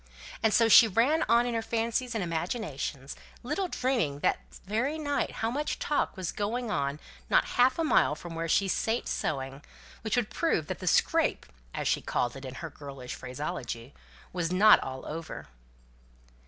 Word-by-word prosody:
And 220 - +3
so 230 +2 +5
she 225 +1 +9
ran 245 - +2
on 235 +1 +5
in 245 - -2
her 230 - 0
fancies 230 +2 -1
and 215 - 0
imaginations, 160 - -3 0.3
little 300 +10 -1
dreaming 235 - -1
that - - +2
that - - -14
very 240 +10 -1
night 285 -2 -1
much 270 +7 -1
talk 295 - -1
was 185 -3 -3
going 225 +3 -2
on 140 -5 -1 0.3
not - - +4
half 255 +1 +4
a 330 - +1
mile 300 - +3
from 170 +2 -9
where 165 0 -3
she 195 +5 +3
sate 225 +5 0
sewing, 135 -1 -3 0.4
that - - -1
would - - 0
prove - - 0
that - - -5
the - - -6
"scrape" - - +2 0.3
(as - - -3
she - - +1
called 120 +1 -1
it, 135 0 -8
in 130 0 -7
her 165 - -6
girlish 135 -3 -8
phraseology) 125 -2 -5 0.4
was 175 -2 -1
not 210 +4 +7
all 130 0 -6
over. 160 +1 -7
195 Hz, 175 wpm, -29 LUFS, 145-240 Hz, 0.4 s, she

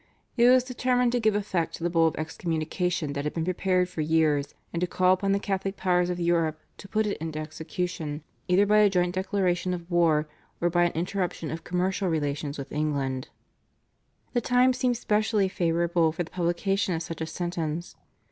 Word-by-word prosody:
It 240 -1 +6
was 255 0 +6
determined 250 -1 +1
to 245 - +1
give 215 -2 +2
effect 190 -5 -1
to - - -9
the 175 - +1
Bull 165 -1 +4
of 160 - -1
excommunication 160 0 -2
that 140 0 -3
had 150 - -3
been 165 -1 -1
prepared 185 0 +1
for 175 -3 -4
years, 150 -2 +1 0.2
and 170 - -2
to 180 - +1
call 185 +1 +3
upon 195 +1 0
the 200 - +3
Catholic 195 0 -2
powers 180 -1 +2
of 180 0 -2
Europe 165 -2 +1 0.2
to 195 - -11
put 215 +2 0
it 205 - -2
into 160 -1 -4
execution 155 0 -4 0.2
either 185 +3 +4
by 210 +1 +4
a 210 -1 +6
joint 180 -2 +1
declaration 185 -1 0
of 175 0 -10
war, 160 -3 +3 0.3
or 175 0 +1
by 175 0 +3
an 175 - +1
interruption 175 -1 -2
of 160 0 -5
commercial 185 +2 0
relations 145 -2 -2
with 140 - -7
England. 140 -4 -2 1.0
The 240 - +2
time 250 +2 +4
seemed 250 -1 0
specially 210 -3 +1
favourable 170 -2 +1
for 175 +3 -3
the 165 - -13
publication 185 +2 0
of 165 - -3
such 165 0 -7
a 160 - -2
sentence. 170 -1 -4
175 Hz, 195 wpm, -27 LUFS, 160-195 Hz, 1.0 s, It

